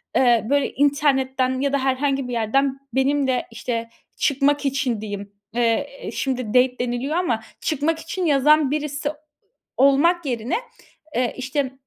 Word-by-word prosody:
Eee, 240 -4 +4
böyle 285 0 +2
internetten 265 -2 +1
ya 280 0 0
da - - +4
herhangi 270 0 0
bir 245 - -5
yerden 265 +4 +1
benimle, 265 -1 +1
işte, 230 0 -4 0.3
çıkmak 285 +1 +2
için 265 -5 0
diyeyim, 205 -1 -6 0.2
eee, 240 +4 0
şimdi 255 -4 -2
date 250 +2 +3
deniliyor 245 +5 -2
ama 335 -11 0 0.2
çıkmak 315 +2 0
için 345 +3 -3
yazan 295 -1 +4
birisi 295 -1 -2 0.7
olmak 290 +6 +4
yerine, 240 -2 -1 0.6
eee, 245 0 0
işte, 260 +1 -2
270 Hz, 130 wpm, -22 LUFS, 250-285 Hz, 0.7 s, Eee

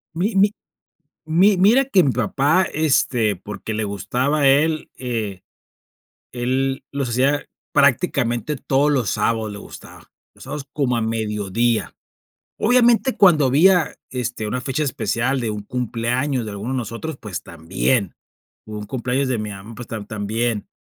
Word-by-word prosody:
Mi 195 +7 0
mi 200 +1 +5 0.7
mi 185 +6 +4
mira 215 +9 +5
que 200 -8 +4
mi 135 - +2
papá, 140 - +2
este, 125 -8 +2
porque 105 +4 -7
le 110 - -1
gustaba 115 - -1
a 140 - +5
él, 155 +3 +2
eh, 110 -7 -4 0.9
él 130 +2 -1
los 140 -3 -3
hacía 135 +4 +1 0.3
prácticamente 140 -2 +2
todos 140 +2 +1
los 130 -7 +1
sábados, 110 0 0
le 100 - -8
gustaba, - - -13 0.2
los - - -16
sábados 145 -2 -6
como 130 -5 0
a - - 0
mediodía. 110 -2 -1 0.6
Obviamente, 240 +2 +3
cuando 165 -8 +5
había, 165 +5 +4 0.2
este, 120 -4 -3
una 125 +3 -2
fecha 135 +4 -2
especial 130 -1 -1
de 115 -2 -2
un 105 -1 -5
cumpleaños 125 +3 -1
de 110 - -6
alguno 105 +5 -5
de 130 - -1
nosotros, 120 +6 -5
pues 105 -4 -6
también, 95 +6 -1 0.5
o 110 - -10
un 105 - -7
cumpleaños 130 +3 -1
de 125 -3 0
mi 105 0 -4
mamá, 105 +3 -9
pues 120 - -8
tam 110 -2 -6
también. 110 +1 -2
125 Hz, 155 wpm, -21 LUFS, 110-145 Hz, 0.9 s, mi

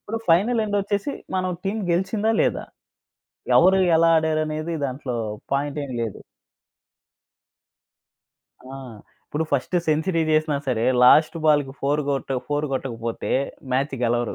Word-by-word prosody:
ఇప్పుడు 225 +2 -5
ఫైనల్ 215 +8 +3
ఎండొచ్చేసి, 205 +5 -1 0.2
మనం 185 0 0
టీమ్ 210 +3 -2
గెలిచిందా 205 +5 0
లేదా? - - -1 0.9
ఎవరు 190 +2 +5 0.2
ఎలా 165 0 +4
ఆడారనేది 155 +1 -1
దాంట్లో 130 -2 -5 0.4
పాయింట్ 145 +1 -1
ఏం 135 - -8
లేదు. 110 -4 -5 2.5
ఆ! - - -7 0.5
ఇప్పుడు 155 +2 -2
ఫస్ట్ 140 +6 -1
సెంచరీ 160 +2 +1
జెసినా 155 -1 +2
సరే, 120 -3 0 0.2
లాస్ట్ 155 +6 +5
బాల్‌కి 145 -3 +3
4 145 +2 +1
గొట్ట 135 0 -3 0.2
4 145 +1 -1
గొట్టకపోతే 115 -4 -3 0.4
మ్యాచ్ 135 +2 0
గెలవరు. 120 0 0
155 Hz, 115 wpm, -23 LUFS, 135-185 Hz, 2.5 s, ఎవరు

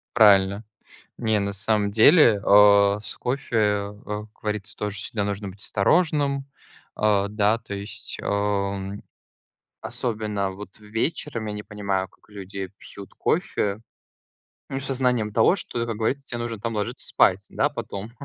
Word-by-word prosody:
Правильно. 100 -2 +5 0.6
Не, 110 -2 +1
на 100 0 -2
самом 105 0 0
деле, 115 - +6
э, 100 0 +6
с 105 - -4
кофе, 125 -1 -2
э, 105 -2 +1 0.4
как - - -33
говорится, 105 -1 -4
тоже 105 -1 -3
всегда 100 +1 -2
нужно 100 0 -3
быть 95 +1 -12
осторожным. 140 - +1 0.5
Э, 105 -2 +2
да, 105 +1 +2
то 110 -3 -8
есть, 100 +1 -7
э, 100 -1 -1 0.9
особенно 105 -4 -2
вот 95 0 -11
вечером, 115 +3 -3
я 105 - -3
не 105 0 -5
понимаю, 100 -3 -2
как - - -28
люди 100 -2 -7
пьют 100 -1 -12
кофе, 100 +1 -1 0.9
ну 135 - -3
со 135 0 -3
знанием 125 -4 +1
того, 115 - +4
что, 120 -10 -3
как 115 -1 -3
говорится, 135 +5 -1
те 120 - -5
нужно 120 -2 -4
там 115 +1 -3
ложиться 115 +5 -3
спать, 95 +1 +3
да, - - +1
потом. 100 +3 -6
105 Hz, 150 wpm, -24 LUFS, 100-115 Hz, 0.9 s, деле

